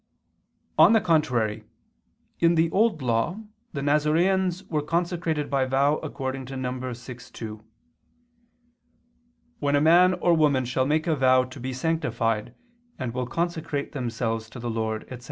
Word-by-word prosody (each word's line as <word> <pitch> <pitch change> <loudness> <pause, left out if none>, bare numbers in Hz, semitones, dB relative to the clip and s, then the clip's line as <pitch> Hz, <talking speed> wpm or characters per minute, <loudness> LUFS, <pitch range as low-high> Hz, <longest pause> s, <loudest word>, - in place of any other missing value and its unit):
On - - +8
the 225 - +6
contrary, 125 - +1 0.8
In 170 0 +4
the 165 0 +2
Old 205 - +2
Law 120 - 0 0.3
the 140 - -3
Nazareans 170 +6 +1
were 155 -2 -1
consecrated 165 -1 -1
by 135 -2 +1
vow 140 +3 +2
according 135 -3 -5
to 135 0 -6
Num. 130 -1 -3
6:2, 120 -3 -8 2.0
"When 145 0 +1
a - - +4
man 175 +4 +5
or 175 - +2
woman 145 -5 +3
shall 130 +2 0
make 155 +2 +1
a 165 -3 +1
vow 130 -2 +4
to 130 +2 -10
be 130 +2 -4
sanctified 120 -6 -1 0.4
and 125 -3 -4
will 125 -1 -2
consecrate 160 -1 -3
themselves 115 -3 -3
to 125 - -10
the 120 0 -3
Lord," 110 -1 -2
etc. 125 - -9
135 Hz, 145 wpm, -25 LUFS, 125-160 Hz, 2.0 s, On